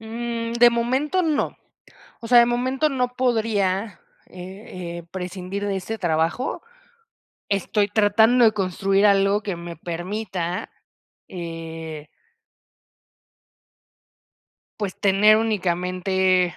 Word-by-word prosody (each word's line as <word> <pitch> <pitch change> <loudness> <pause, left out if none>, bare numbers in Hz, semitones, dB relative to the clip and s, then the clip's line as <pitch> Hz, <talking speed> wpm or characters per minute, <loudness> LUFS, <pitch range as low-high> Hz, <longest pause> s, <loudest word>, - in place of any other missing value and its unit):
Mm, 230 +1 -4
de 240 0 +6
momento 260 +10 0
no, 310 -4 0 0.6
o 230 - -7
sea, 245 0 +7
de 235 - +7
momento 255 +5 0
no 255 -3 0
podría, 215 -5 0 0.3
eh 180 -2 -8
eh, - - -8
prescindir 190 +2 -5
de 200 -1 -1
este 220 +4 -5
trabajo. 165 +8 -1 0.9
Estoy 200 +1 +1
tratando 220 +4 +4
de 220 - +4
construir 195 0 +1
algo 200 +1 +3
que 195 -4 -4
me 170 0 -8
permita, 175 +1 -4 0.6
eh 165 -3 -7 2.7
pues, 205 -3 -4
tener 205 +2 +5
únicamente 185 -3 +1
200 Hz, 100 wpm, -23 LUFS, 180-230 Hz, 2.7 s, sea